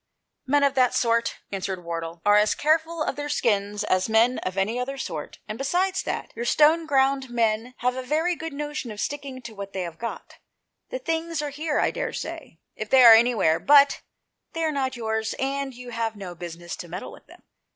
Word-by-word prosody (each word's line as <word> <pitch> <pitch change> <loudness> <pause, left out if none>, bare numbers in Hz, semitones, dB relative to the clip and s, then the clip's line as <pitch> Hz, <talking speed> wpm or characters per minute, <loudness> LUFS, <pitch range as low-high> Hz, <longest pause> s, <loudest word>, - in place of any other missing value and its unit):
" - - -56
Men 285 +2 +3
of 280 -1 +3
that 255 -2 +3
sort," 230 -1 +1 0.2
answered 190 -2 -4
Wardle, 165 0 -5
" - - -38
are 205 0 +6
as 210 +1 +4
careful 320 +1 +1
of - - -2
their 290 0 -4
skins 205 -6 0
as 185 0 +1
men 230 +3 +3
of 185 +1 -5
any 215 +5 0
other 270 +2 -3
sort, 160 - -6
and 215 - -6
besides 360 +7 0
that, - - -4
your 235 - -4
Stoneground 275 -2 +3
men 230 +1 0
have 250 +1 0
a 260 - -3
very 315 +7 0
good 325 0 -6
notion 295 -2 -5
of 210 -1 -8
sticking 275 -2 -4
to 230 -1 -8
what 200 -1 -8
they 190 - -2
have 170 -2 -8
got. 230 - -7 0.5
The - - -3
things 330 -8 -2
are 290 - -3
here, 300 +1 -2
I - - +2
daresay, - - -5 0.2
if 215 0 -6
they 265 -1 +7
are 230 -2 +11
anywhere; 225 -8 +4
but 285 -1 +5 0.5
they 330 - -2
are 315 - +1
not 265 -2 -1
yours, 220 -1 -2
and 275 0 -2
you 250 0 -10
have 225 -1 -2
no 190 -3 -7
business 175 0 -7
to 175 - -8
meddle 170 - -7
with - - -15
them. - - -17
250 Hz, 210 wpm, -25 LUFS, 210-290 Hz, 0.5 s, are